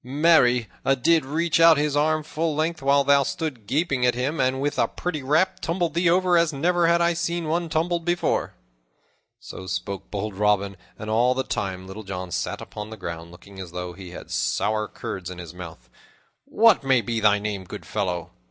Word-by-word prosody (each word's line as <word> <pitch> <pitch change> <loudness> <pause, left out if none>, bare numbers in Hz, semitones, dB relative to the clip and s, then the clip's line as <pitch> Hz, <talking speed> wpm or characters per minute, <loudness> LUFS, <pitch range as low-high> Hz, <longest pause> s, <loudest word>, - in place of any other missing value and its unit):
Marry, 125 -4 +3 0.2
'a 135 - +3
did 160 +5 +3
reach 160 +4 0
out 165 -1 +7
his 145 0 0
arm 155 +1 +2
full 155 0 -2
length 160 +1 -1
while 140 +1 +3
thou 140 0 +5
stood 135 -6 -4
gaping 140 - 0
at 125 -1 +3
him, 135 +5 -2
and, 130 0 +1
with 145 +1 -1
a - - +3
pretty 165 -5 -4
rap, 165 +8 +1
tumbled 170 -2 -1
thee 170 +1 +2
over 180 0 +4
as 170 -1 +2
never 170 +4 +1
have 170 0 +4
I 170 0 +3
seen 170 0 -2
one 170 +1 -1
tumbled 170 +2 0
before." 175 +1 -1 0.8
So 95 - -9
spoke 95 +1 -4
bold 105 +1 -4
Robin, 100 0 +1 0.2
and 105 - -8
all 120 +3 +3
the 130 - 0
time 95 -5 -4
Little 95 +3 -8
John 95 -3 -6
sat - - -3
upon 105 0 -8
the 110 - -9
ground, 85 -3 -6
looking 95 +3 -14
as 90 -2 -8
though 90 0 -5
he 95 0 -10
had 85 - -10
sour 105 - 0
curds 95 -2 -6
in 90 - -8
his 85 -2 -9
mouth. 85 -2 -10 0.6
"What 225 -7 +4
may 130 -3 +3
be 115 +1 -2
thy 105 -1 +4
name, 100 -2 -4
good - - -9
fellow?" 90 -3 -3
130 Hz, 200 wpm, -24 LUFS, 100-165 Hz, 0.8 s, out